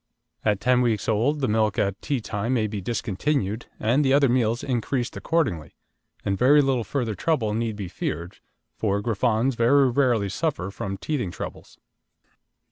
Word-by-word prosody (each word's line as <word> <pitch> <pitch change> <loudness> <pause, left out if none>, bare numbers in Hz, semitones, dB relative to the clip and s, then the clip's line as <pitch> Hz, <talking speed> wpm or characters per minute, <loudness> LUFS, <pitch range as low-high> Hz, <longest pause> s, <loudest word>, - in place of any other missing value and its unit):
At 105 -3 +1
ten 125 +3 +3
weeks 110 -6 0
old 125 +8 +1
the 130 - +1
milk 110 -1 +1
at 100 0 0
tea 140 -5 -1
time 110 +4 -2
may 110 -3 +1
be 105 -2 -4
discontinued 115 +1 -2
and 120 +7 +2
the 135 -1 +3
other 140 -1 +4
meals 120 -1 +1
increased 125 -1 -2
accordingly, 130 - -1 0.5
and 100 - +1
very 135 +8 +5
little 135 -4 +2
further 120 -3 -2
trouble 110 - 0
need 115 -1 -1
be 100 -3 -5
feared, 85 +1 -5 0.4
for 100 -2 0
Griffons 115 +3 +1
very 125 +3 +4
rarely 120 -6 +2
suffer 100 - -2
from 95 0 -5
teething 135 - -2
troubles. 85 - -8
115 Hz, 160 wpm, -24 LUFS, 105-130 Hz, 0.5 s, very